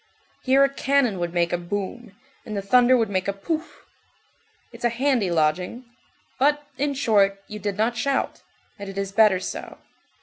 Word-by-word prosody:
Here 270 +1 +4
a 275 0 +1
cannon 270 -8 +1
would 175 -1 -2
make 175 0 0
a 175 - 0
boum, 205 +5 -5 0.3
and 210 -2 -6
the 200 - -3
thunder 250 +5 +5
would 225 -3 0
make 185 0 -1
a 200 - 0
pouf. 315 +12 -5 0.9
It's - - -13
a 240 - +3
handy 240 -4 +1
lodging. 175 +9 0 0.5
But, 295 +2 +2
in 285 0 0
short, 200 -7 +2
you 210 - -7
did 205 0 -3
not 225 +3 +1
shout, 270 +4 -1 0.4
and 200 -1 -7
it 195 - -9
is 195 0 -2
better 200 -2 +4
so. 185 - -6
210 Hz, 175 wpm, -24 LUFS, 195-260 Hz, 0.9 s, thunder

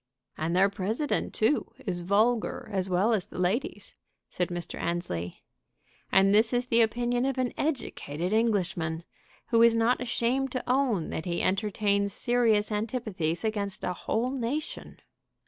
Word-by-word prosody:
"And 165 +2 -2
their 190 +2 +5
President, 210 +8 -1
too, 220 +7 +1
is 180 -4 -2
vulgar 215 +6 +1
as 190 -1 -1
well 190 +6 +2
as 200 -5 0
the - - -11
ladies," 185 +9 -1 0.4
said 180 - -1
Mr. 175 -2 -6
Annesley. 90 - -3 0.7
"And 195 +1 +5
this 225 +3 +4
is 245 0 +1
the 235 -2 +3
opinion 240 +2 +1
of 270 0 -1
an 255 -1 0
educated 185 - -2
Englishman, 180 -7 0 0.5
who 230 -1 +4
is 230 0 +6
not 230 +3 +2
ashamed 250 +2 0
to 255 - -2
own 250 - +1
that 160 - -4
he 170 -1 -1
entertains 200 0 +1
serious 230 -4 +2
antipathies 210 -7 -2
against 205 -3 -2
a 180 - -1
whole 230 +7 -1
nation!" 270 +4 -4
215 Hz, 145 wpm, -28 LUFS, 185-240 Hz, 0.7 s, is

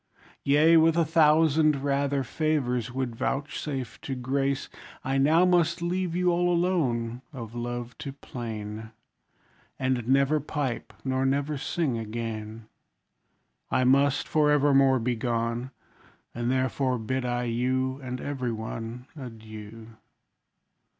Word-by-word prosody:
Yea, 155 +4 +5
with 165 +1 +4
a 170 - +4
thousand 155 -2 +4
rather 140 0 +1
favours, 125 -4 -1
would 130 -2 -3
vouchsafe 135 0 -3
to 135 - -4
grace, 135 +2 -1 0.4
I 135 +1 0
now 160 +6 +5
must 175 -1 +3
leave 175 0 -1
you 180 0 +2
all 175 +1 +2
alone, 130 -10 0
of 115 -6 -8
love 120 0 -4
to 145 -3 -5
plain; 110 -5 -6 0.9
And 130 -3 -1
never 140 +3 +3
pipe, 140 -4 -3
nor 130 0 0
never 140 +3 0
sing 135 -2 -1
again! 110 0 -5 1.0
I 130 - +2
must, 140 +2 +3
for 155 -3 +3
evermore, 135 -2 +5
be 120 0 0
gone; 115 +1 -1 0.6
And 120 +1 -2
therefore 130 0 +1
bid 130 +3 -2
I 120 0 -1
you, 130 +3 0
And 130 -1 -5
every 130 -4 -3
one, 115 +2 -6
Adieu! 110 -3 -10
130 Hz, 125 wpm, -27 LUFS, 120-150 Hz, 1.0 s, Yea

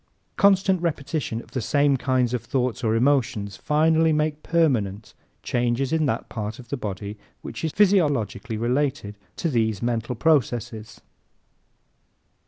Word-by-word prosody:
Constant 195 -2 +3
repetition 145 -7 -2
of 115 - -21
the 130 - -2
same 140 +4 +2
kinds 130 -2 0
of 125 - -2
thoughts 125 -2 -1
or 110 -1 +2
emotions 120 -5 +1
finally 160 +4 +2
makes 150 0 0
permanent 115 - 0 0.3
changes 120 +3 0
in 160 -2 +2
that 115 -3 -2
part 110 0 -5
of 120 -3 -13
the - - -1
body 105 -3 -6 0.2
which - - -7
is 160 - 0
physiologically 145 - +1
related 125 -2 -1 0.2
to - - -2
these 110 -7 0
mental 120 0 -2
processes. 115 -6 0
125 Hz, 135 wpm, -24 LUFS, 110-150 Hz, 0.3 s, Constant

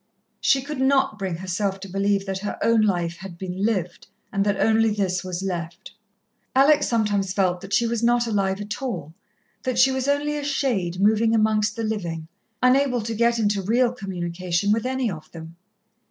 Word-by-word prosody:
She 270 -1 +2
could 295 -1 -5
not 265 -5 +2
bring 190 -3 -2
herself 190 +2 -2
to 195 - -7
believe 195 +1 0
that 190 -1 -3
her 205 +1 -4
own 230 0 +4
life 175 -5 0
had 180 -1 -9
been 185 +1 -4
lived, 195 -6 -1 0.3
and 200 -1 +2
that 200 -1 +1
only 225 0 +3
this 190 -4 -1
was 185 0 -4
left. 175 -2 -5 0.6
Alex 290 +2 +5
sometimes 205 -4 0
felt 185 -3 +1
that 195 - -10
she 235 - +3
was 230 -1 -1
not 240 0 +3
alive 195 -3 0
at 210 +3 -5
all 175 - -4 0.5
that 255 -2 -2
she 260 +2 +5
was 265 0 -2
only 290 +1 +1
a 295 - -4
shade 235 -11 -1
moving 220 +3 +3
amongst 215 -1 +2
the 230 - -3
living, 170 -8 -3 0.4
unable 255 -1 +3
to 225 +1 -4
get 235 +1 +2
into 205 -3 +1
real 235 +5 +2
communication 185 -3 -2
with 225 +3 +1
any 260 -3 -1
of 155 -3 -9
them. 165 0 -10
205 Hz, 185 wpm, -23 LUFS, 185-235 Hz, 0.6 s, Alex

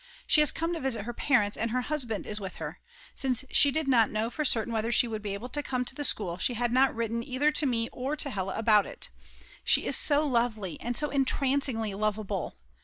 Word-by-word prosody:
She 305 - +4
has 300 - +4
come 330 +1 -2
to 335 - -3
visit 235 -7 -2
her 240 - -5
parents 230 -5 +1
and 230 - -2
her 250 +3 0
husband 250 -6 -3
is 210 0 -4
with 190 -2 -7
her; - - -7 0.3
since 260 -2 0
she 285 - +7
did 310 +1 -2
not 235 -5 +4
know 220 +2 -2
for 305 - -2
certain 235 -4 0
whether 225 +1 -1
she 240 +1 +4
would 220 -2 -5
be 205 -1 -4
able 235 +5 -7
to 290 - -2
come 255 -3 -2
to - - -7
the 290 - -5
school 185 -10 -1
she 245 - +1
had 240 +1 0
not 260 +1 +3
written 230 0 -2
either 275 +4 0
to 300 -1 +2
me 230 -2 0
or 270 +4 -3
to 285 -2 -2
Hella 190 -3 -3
about 215 -2 +4
it. - - -7 0.5
She - - +2
is - - +1
so 295 0 +3
lovely 235 - -1
and 240 0 -2
so 295 -1 0
entrancingly 270 -5 +1
loveable. 205 -2 -2
240 Hz, 235 wpm, -28 LUFS, 215-275 Hz, 0.5 s, she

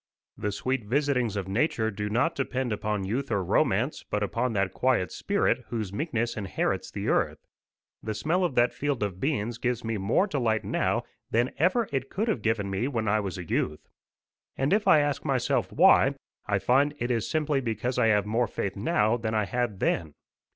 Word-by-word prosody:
The 105 - -2
sweet 130 +3 -2
visitings 125 -2 +1
of 100 -2 -3
nature 110 +1 0
do 105 0 -4
not 125 +10 +1
depend 130 -3 -2
upon 105 -1 -2
youth 125 +8 -2
or 100 - 0
romance, 110 - +1
but 105 0 -2
upon 115 +4 -1
that 95 -2 0
quiet 125 -8 +1
spirit 200 -10 0
whose 110 -5 -4
meekness 120 -3 -1
inherits 100 -4 -2
the - - -5
earth. - - +1 0.6
The 110 -1 -4
smell 175 - 0
of 170 -7 0
that 120 0 +3
field 145 -6 -1
of 95 -3 -3
beans 120 -3 -1
gives 125 -1 -1
me 110 -2 -2
more 105 - +2
delight 120 - 0
now - - 0 0.3
than 120 +3 +1
ever 195 - +3
it 135 -1 -2
could 215 +5 -2
have 215 - 0
given 110 -3 0
me 95 +6 -1
when 115 -6 -2
I 110 +1 +3
was 100 -2 -4
a 90 - -6
youth. 75 -1 -2 0.7
And 135 +7 +1
if 210 +1 +2
I 150 - +7
ask 145 -1 -1
myself 135 -5 0
why - - +5 0.3
I 100 - +2
find 135 +9 +2
it 120 -1 -2
is 115 -3 -1
simply 150 -3 +1
because 120 +1 -2
I 115 - +4
have 105 -2 +3
more 115 +3 +1
faith 95 -2 -3
now 105 +3 +1
than 110 -1 -2
I 105 -1 +2
had 120 -2 -2
then. 80 -4 -1
115 Hz, 195 wpm, -27 LUFS, 105-135 Hz, 0.7 s, I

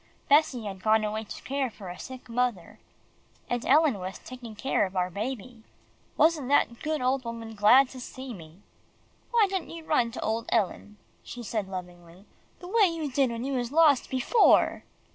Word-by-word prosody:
Bessie 280 -5 +3
had 195 -2 -6
gone 220 +1 +3
away 215 +1 -3
to - - -9
care 275 -1 -1
for 200 -4 -10
a 175 - -8
sick 260 -1 -9
mother, 230 -4 -2 0.7
and 245 0 -2
Ellen 290 -6 +4
was 185 +1 -6
taking 245 -4 -10
care 210 -3 0
of 190 - -14
our 180 0 0
baby. 230 +3 -5 0.6
Wasn't 315 -5 +3
that 245 -4 +2
good 310 -1 -2
old 260 +1 +1
woman 230 -1 -7
glad 220 +6 +6
to 260 - -10
see 260 0 -8
me! 165 0 -13 0.7
"Why 465 -3 +4
didn't 380 -3 -3
you 330 -1 -9
run 245 -7 +2
to - - -6
old 225 +1 -2
Ellen," 210 0 -1 0.2
she 240 - -9
said 215 -3 -3
lovingly, 180 0 -9 0.4
"the 355 - -8
way 420 +2 +4
you 325 -4 -3
did 265 0 +2
when 235 0 -4
you 275 +1 -2
was 245 -2 -2
lost 300 -4 +4
before?" 260 - +3
240 Hz, 180 wpm, -27 LUFS, 210-275 Hz, 0.7 s, glad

